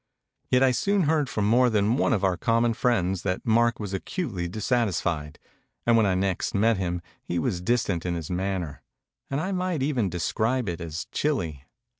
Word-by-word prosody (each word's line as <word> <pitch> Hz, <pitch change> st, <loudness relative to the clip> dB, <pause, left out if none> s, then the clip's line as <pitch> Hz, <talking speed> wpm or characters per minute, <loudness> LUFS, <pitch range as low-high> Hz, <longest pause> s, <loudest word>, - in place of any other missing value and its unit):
Yet 125 Hz, +1 st, +4 dB
I 130 Hz, -, +5 dB
soon 195 Hz, +9 st, +1 dB
heard 150 Hz, -3 st, +1 dB
from 105 Hz, -, -1 dB
more 125 Hz, +4 st, +4 dB
than 105 Hz, +1 st, +2 dB
one 145 Hz, -, +2 dB
of 105 Hz, -6 st, +1 dB
our 95 Hz, -2 st, +3 dB
common 115 Hz, +5 st, +2 dB
friends 95 Hz, -7 st, +1 dB
that 90 Hz, 0 st, -2 dB
Mark 115 Hz, +1 st, +3 dB
was 100 Hz, -3 st, -5 dB
acutely 95 Hz, -, -3 dB
dissatisfied; 90 Hz, -, -1 dB, 0.5 s
and 115 Hz, -, +4 dB
when 110 Hz, -2 st, +4 dB
I 95 Hz, -, +2 dB
next 95 Hz, +1 st, -1 dB
met 110 Hz, +2 st, +3 dB
him, 90 Hz, -2 st, -2 dB, 0.2 s
he 85 Hz, -, -3 dB
was 85 Hz, +2 st, -1 dB
distant 100 Hz, -5 st, 0 dB
in 90 Hz, -1 st, -2 dB
his 85 Hz, 0 st, -5 dB
manner, 90 Hz, -4 st, -2 dB, 0.5 s
and 140 Hz, -, -1 dB
I 185 Hz, +5 st, -2 dB
might 180 Hz, -6 st, -1 dB
even 130 Hz, -8 st, +1 dB
describe 110 Hz, +8 st, 0 dB
it 85 Hz, -1 st, -3 dB
as 85 Hz, -1 st, -5 dB
chilly. 85 Hz, -, -1 dB
105 Hz, 185 wpm, -26 LUFS, 90-125 Hz, 0.5 s, I